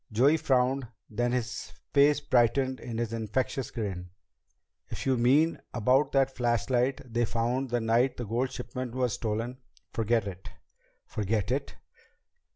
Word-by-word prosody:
Joey 135 +9 +4
frowned, 135 -3 +1 0.2
then 120 +3 0
his 120 -3 -3 0.2
face 145 +1 +5
brightened 130 +1 +2
in 115 -2 -6
his 115 -1 -2
infectious 115 +3 -2
grin. 95 -5 -4 0.8
"If - - -5
you 130 - +3
mean 140 +7 +3 0.2
about 130 +5 +3
that 135 -1 +2
flashlight 125 +2 +1
they 120 0 +2
found 120 +4 -1
the 120 0 0
night 115 +3 +2
the 120 - -4
gold 120 +5 0
shipment 125 -1 -5
was 125 -3 +1
stolen, 115 +3 -3 0.3
forget 115 -1 +1
it." 95 -1 -7 0.6
"Forget 105 +1 -1
it?" 140 +2 -2
120 Hz, 140 wpm, -29 LUFS, 115-130 Hz, 0.8 s, face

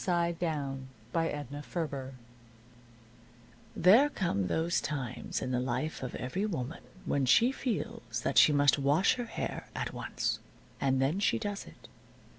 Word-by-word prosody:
XI 170 -2 +1
SUN 140 -6 -2 0.3
DRIED 145 -2 -3 1.6
There 220 - +6
come 100 - -1
those 165 - +1
times 135 -6 -3
in 130 - -3
the 125 - +1
life 130 +5 -2
of 130 - -5
every 185 +12 -2
woman 160 -5 -4 0.2
when 140 -2 +1
she 235 - +6
feels 120 - -3
that - - +4
she - - +7
must 145 -1 +4
wash 145 +7 +4
her 245 - -3
hair 225 - -4
at - - -3
once. - - -2 0.4
And 135 -1 +2
then 140 +8 +1
she 205 - +2
does 205 -2 -4
it. - - -14
145 Hz, 140 wpm, -31 LUFS, 130-180 Hz, 1.6 s, she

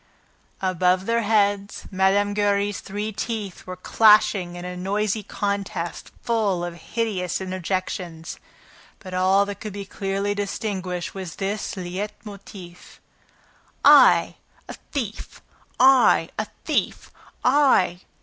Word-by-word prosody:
Above 185 0 +2
their 230 +1 +1
heads, 205 -2 +1
Mme. 195 +2 +2
Giry's 205 0 +1
three 210 +2 -4
teeth 210 -3 -5
were 185 - -5
clashing 210 -2 +4
in 175 0 -7
a 180 0 -5
noisy 205 +3 -1
contest, 200 -4 -4
full 205 -7 0
of 175 - -5
hideous 185 0 -3
interjections. 185 -3 -4 0.6
But 185 -2 -10
all 190 +2 +3
that 200 -1 -7
could 215 -2 -7
be 200 0 -6
clearly 195 +1 -2
distinguished 195 -3 -3
was 185 -4 -7
this 200 +1 -3
LEIT 185 +3 -4
MOTIF: 195 -3 -12 0.9
"I, - - +7 0.3
a - - -7 0.2
thief!... 225 -7 -5 0.4
I, 260 0 +5
a - - -1 0.2
thief, - - -1 0.3
I?" 250 -10 +3
200 Hz, 115 wpm, -23 LUFS, 185-210 Hz, 0.9 s, I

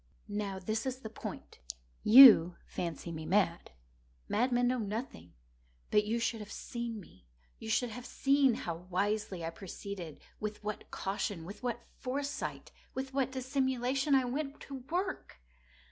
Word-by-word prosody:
Now 205 -2 -3
this 215 +6 -2
is 260 0 -3
the 220 - -7
point. 220 - -8 0.4
You 215 -8 +10
fancy 170 0 -4
me 160 -1 -6
mad. 180 -2 +1 0.6
Madmen 245 +2 +2
know 250 0 +1
nothing. 205 - -5 0.6
But 210 - +4
you 225 +2 0
should 230 -1 -1
have 210 -1 -8
seen 235 -2 -5
me. 95 - -16 0.3
You 220 - -7
should 235 +1 +1
have 245 +3 -7
seen 275 -3 +3
how 170 -1 -4
wisely 195 -1 -1
I 165 - -3
proceeded—with 200 +3 -7
what 210 0 -5
caution—with 195 -1 -4
what 240 -1 -3
foresight—with 270 0 -5
what 265 -1 +1
dissimulation 265 +1 +1
I 260 -1 +3
went 275 +3 -3
to 275 - -7
work! 370 - -3
225 Hz, 135 wpm, -32 LUFS, 195-260 Hz, 0.6 s, You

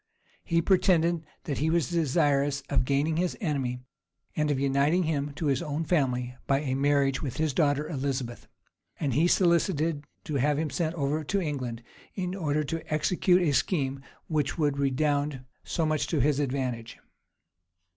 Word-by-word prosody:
He 170 0 +1
pretended 170 -4 +3 0.2
that 140 - -3
he 155 +3 +1
was 170 0 +1
desirous 145 -3 +1
of 130 -3 +2
gaining 145 +4 +1
his 180 +1 0
enemy, 135 - -2 0.5
and 150 -1 +1
of 140 -2 +1
uniting 140 +6 +2
him 145 -3 -1
to 160 - -3
his 135 -3 +1
own 155 -1 -2
family 125 -7 0
by 135 0 +2
a 135 -4 -2
marriage 140 0 +2
with 135 -5 -4
his 155 -2 0
daughter 145 +1 +1
Elizabeth; 135 -5 -3 0.5
and 140 -5 0
he 155 +7 +3
solicited 165 -4 +2 0.2
to 150 - -2
have 145 +2 +2
him 155 -1 -1
sent 165 -1 -1
over 150 0 -1
to 200 +7 0
England, 130 -9 -3 0.3
in 180 -2 -2
order 155 -5 0
to 165 +3 -5
execute 180 +3 +3
a 155 - +2
scheme 135 -4 0 0.2
which 155 0 -1
would 145 -3 +1
redound 145 0 0 0.2
so 165 - -1
much 155 -1 0
to 160 - 0
his 145 +2 +2
advantage. 125 -4 -2
145 Hz, 165 wpm, -28 LUFS, 140-160 Hz, 0.5 s, pretended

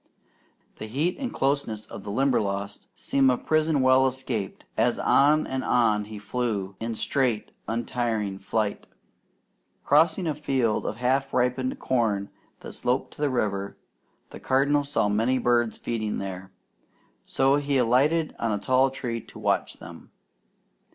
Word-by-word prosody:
The 110 - -7
heat 150 - -1
and 260 -3 -3
closeness 135 -6 -1
of - - -10
the 100 - -7
Limberlost 100 -5 -1
seemed 135 -1 +2
a 125 - +2
prison 155 -2 +1
well 130 +1 +5
escaped, 125 -6 -4
as - - +2
on 150 +2 +4
and 130 0 -3
on 110 -4 +2
he 105 0 -9
flew 100 -2 -3
in 115 0 -3
straight 125 -4 0 0.2
untiring 115 -4 -2
flight. 105 +1 -2 1.0
Crossing 160 +5 +3
a 155 - 0
field 135 -6 0
of 105 - -3
half 130 +3 0
ripened 130 +1 0
corn 105 -6 0 0.3
that - - -8
sloped 125 +2 -1
to - - -11
the 145 - +2
river, 100 -6 -2 0.5
the - - -9
Cardinal 140 +2 +2
saw 140 -7 0
many 115 +5 +1
birds 120 -2 +1
feeding 110 -3 -3
there, 95 -1 -6 0.7
so 135 +1 +2
he 145 -1 0
alighted 140 +7 +2
on 115 - 0
a 105 - 0
tall 130 +6 +3
tree 120 -3 -4
to - - -15
watch - - 0
them. - - -12
125 Hz, 145 wpm, -26 LUFS, 110-135 Hz, 1.0 s, well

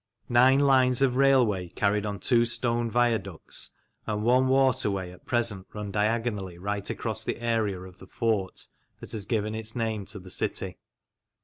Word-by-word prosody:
Nine 125 +3 +5
lines 130 -2 +4
of 125 -2 +2
railway, 125 -9 +3
carried 105 +2 0
on 100 -1 -3
two 120 +5 +3
stone 120 0 0
viaducts, 110 -7 0 0.4
and 105 0 -2
one 125 +3 +4
waterway 130 -9 +1
at 90 - -17
present 115 -6 0
run 105 -1 -5
diagonally 105 -3 -1
right 100 +2 -3
across - - -3
the - - -3
area 115 -5 0
of 95 -1 -12
the 95 - -13
fort 105 -3 -2 0.3
that - - -9
has 105 -3 -4
given 110 -2 -1
its 110 0 -4
name 110 -4 -2
to 105 +1 -5
the 95 -1 -10
city. - - -2
110 Hz, 165 wpm, -27 LUFS, 100-120 Hz, 0.4 s, Nine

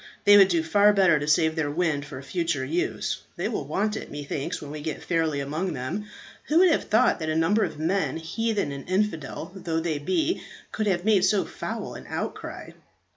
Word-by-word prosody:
They 205 - +8
would 195 -2 +8
do 170 -3 +1
far 205 +6 +4
better 185 -6 +4
to 145 - -4
save 160 +1 +3
their 155 -3 0
wind 150 -2 -1
for 140 -3 -8
future 165 -3 -1
use. 165 +6 -2
They - - -2
will - - -3
want 210 +2 0
it, - - -6
methinks, 145 -1 -4
when 145 - -8
we 150 0 -6
get 155 0 -5
fairly 160 -4 0
among 155 +6 -2
them. 130 +10 -4 0.4
Who 310 - +2
would 365 0 +6
have - - +1
thought 230 0 +3
that 155 -1 -3
a 155 - 0
number 185 +7 +3
of - - -3
men, 170 +3 0
heathen 200 +1 -1
and 140 +3 -8
infidel 185 -5 -1
though 170 -4 -2
they 160 -3 -2
be, 315 - 0 0.3
could 215 -1 -2
have 180 -2 0
made 210 -4 +4
so 205 0 +3
foul - - -5
an - - -10
outcry?" - - -5
165 Hz, 205 wpm, -26 LUFS, 150-205 Hz, 0.4 s, They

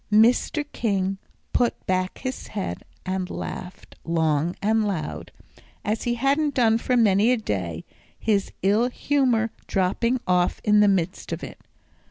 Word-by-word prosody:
Mr. 240 +7 +4
King 195 -3 0 0.3
put 240 -1 +1
back 185 0 0
his 260 0 -5
head 190 - -4 0.2
and 185 0 -2
laughed 180 +1 -7
long 160 0 +1
and 220 +2 +2
loud, 170 -7 -4 0.5
as 215 +1 -1
he 240 0 +1
hadn't 280 +3 +1
done 225 -3 +4
for 250 +1 +1
many 215 0 +4
a 250 - +3
day, 90 - -3 0.3
his 205 -3 0
ill 210 +6 +3
humour 250 -5 +1 0.2
dropping 225 +6 +1
off 180 -1 +2
in 210 0 +4
the 210 - +6
midst 190 -4 0
of - - -4
it. - - -8
210 Hz, 145 wpm, -24 LUFS, 185-240 Hz, 0.5 s, the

